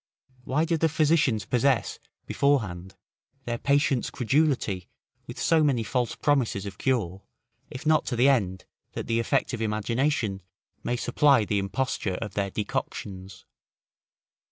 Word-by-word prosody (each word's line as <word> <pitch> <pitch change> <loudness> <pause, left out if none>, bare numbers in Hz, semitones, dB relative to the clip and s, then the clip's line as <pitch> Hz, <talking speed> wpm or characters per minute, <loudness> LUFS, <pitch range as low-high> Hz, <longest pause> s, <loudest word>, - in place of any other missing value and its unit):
Why 150 +5 +1
do 165 0 0
the 160 +1 +2
physicians 150 -8 +2
possess, 125 0 +1 0.3
before 140 -3 +2
hand, 95 0 -8 0.5
their 120 -1 -3
patients' 140 -3 +1
credulity 130 - 0 0.4
with - - -8
so 160 -2 +3
many 135 -6 +2
false 120 +1 -1
promises 130 -9 0
of 100 -1 -8
cure, 105 -8 -1 0.5
if 130 - -8
not 155 0 +3
to 125 - -1
the 125 +3 +4
end, 95 -9 +1 0.3
that - - -4
the 115 0 0
effect 135 +3 0
of 115 - -3
imagination 110 0 -1 0.4
may 120 - -1
supply 125 0 +3
the 105 0 0
imposture 100 -1 -2
of 105 0 -5
their 100 0 -1
decoctions? 95 -1 -5
120 Hz, 140 wpm, -26 LUFS, 100-140 Hz, 0.5 s, the